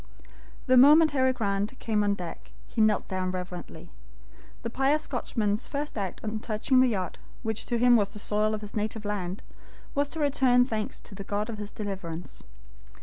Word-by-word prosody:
The 255 -1 +5
moment 300 +4 +8
Harry 260 -2 +3
Grant 205 0 -1
came 215 -3 0
on 205 0 +2
deck, 175 -3 -8 0.2
he 225 - -2
knelt 215 -2 +3
down 185 -1 -2
reverently. 180 -1 -7 0.7
The 230 - -3
pious 280 +5 +2
Scotchman's 215 -4 -1
first 290 +1 -4
act 195 -4 -4
on 215 0 -2
touching 225 +4 +1
the 260 - +6
yacht, 190 -5 -3 0.2
which 220 -2 -3
to 240 - 0
him 245 +1 +6
was 205 -3 +3
the - - -7
soil 210 +1 +1
of 215 - -6
his 210 -1 -9
native 215 0 -2
land, 195 -2 -3 0.5
was 285 0 +1
to 320 - -5
return 265 -4 +4
thanks 220 -4 -3
to - - -13
the 200 0 -7
God 210 +3 -2
of 215 - -7
his 210 -1 -6
deliverance. 185 -5 -6
215 Hz, 185 wpm, -28 LUFS, 200-255 Hz, 0.7 s, moment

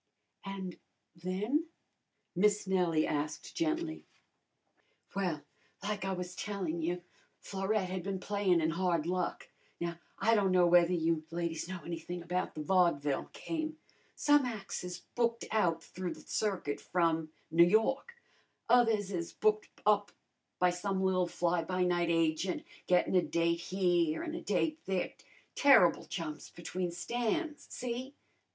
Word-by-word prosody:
"And 195 -2 -6 0.4
then?" 205 - -1 0.7
Miss 205 +3 +3
Nellie 180 -5 +2
asked 150 0 -3
gently. 325 0 -1 1.1
"Well, 180 -7 -1 0.4
like 205 -1 -2
I 195 - -1
was 180 -1 -4
tellin' 185 -6 -3
you, 175 +2 -2 0.3
Florette 195 0 -1
had 185 -1 -2
been 190 +1 -3
playin' 195 -3 +2
in 160 +1 +2
hard 170 -2 +1
luck. 180 0 -2 0.3
Now 170 0 -3 0.2
I 225 +3 +3
don' 200 -4 +3
know 180 -1 +5
whether 175 0 +6
you 165 -2 +1
ladies 170 -1 -2
know 185 -2 -5
anything 170 +1 -5
about 180 +1 -2
the 155 - -4
vodvil 150 -5 +2
game. 315 -1 -4 0.4
Some 290 -3 +4
ac's 210 -7 -5
is 180 0 -5
booked 235 -1 0
out 170 -7 +2
through 185 -1 -5
the - - -13
circuit 190 -9 -2
from 165 -3 +1 0.2
N' 170 +2 +6
Yawk; 270 - +2 0.5
others 225 -4 +4
is 170 -3 -3
booked 215 0 +1 0.2
up 205 -1 +3 0.5
by 180 0 +4
some 190 +2 -1
li'l 185 -1 +2
fly 175 0 0
by 185 +2 0
night 175 -1 +2
agent, 165 +2 +1 0.2
gettin' 180 +1 +3
a 180 - +6
date 170 0 +1
here 175 - +1
an' 320 -2 -4
a 335 - -4
date 315 -1 0
there, 190 -2 -1 0.4
terrible 265 - +6
jumps 160 -4 -5
between 175 +1 -4
stands, 245 - -2
see? 255 +3 -4
185 Hz, 140 wpm, -32 LUFS, 170-210 Hz, 1.1 s, whether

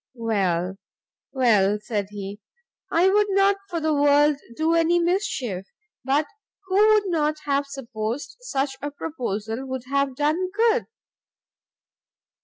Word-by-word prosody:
"Well, 195 -5 -1 0.5
well," 210 -6 +3
said 210 -2 -3
he, 205 0 -7 0.5
"I 340 +3 +4
would 415 +2 +3
not 395 0 +3
for 345 -2 -2
the 315 -1 +1
world 290 0 +4 0.2
do 320 +4 +1
any 335 +1 +3
mischief, 305 - -1 0.4
but 280 +4 +2 0.4
who 375 0 -3 0.2
would 425 -1 +3
not 310 -4 0
have 280 0 0
supposed 245 - -5
such 275 - -2
a 290 - -3
proposal 240 -6 -4
would 260 -1 -4
have 275 -1 0
done 310 +6 0
good?" 455 +4 +2
285 Hz, 125 wpm, -24 LUFS, 225-335 Hz, 0.5 s, I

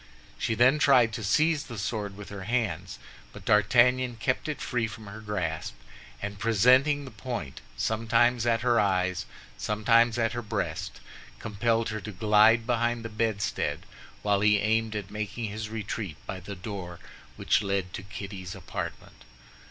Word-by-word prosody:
She 115 - 0
then 125 +6 +5
tried 125 -6 +5
to 115 - -4
seize 150 +8 +2
the 120 - -8
sword 100 -1 -3
with 105 - -9
her 100 -2 -7
hands; 100 -7 -2 0.3
but - - -12
D'Artagnan 120 +4 +4
kept 130 +6 -1
it 150 - -3
free 120 -5 -1
from 110 0 -10
her 100 +2 -9
grasp, 90 -7 -3 0.5
and 105 0 -5
presenting 130 +7 +4
the 130 - -9
point, 110 - -6 0.2
sometimes 115 - +2
at 115 -2 +2
her 120 -1 +3
eyes, 95 -3 +1 0.3
sometimes 115 +2 +3
at 115 0 +1
her 120 - -3
breast, 110 - -4 0.4
compelled 115 +2 0
her 110 -1 -4
to 110 - -6
glide 105 +3 +4
behind 120 -1 0
the - - -3
bedstead, 110 -2 -1 0.4
while 100 -1 +2
he 105 0 +5
aimed 110 +2 +1
at 100 -2 -5
making 105 +2 -4
his 110 +1 -5
retreat 105 -6 -4
by 95 - -5
the 100 +3 -8
door 90 -2 -6 0.4
which 115 - +2
led 100 -2 -2
to - - -5
Kitty's 95 -2 -7
apartment. - - -7
110 Hz, 160 wpm, -28 LUFS, 100-120 Hz, 0.5 s, then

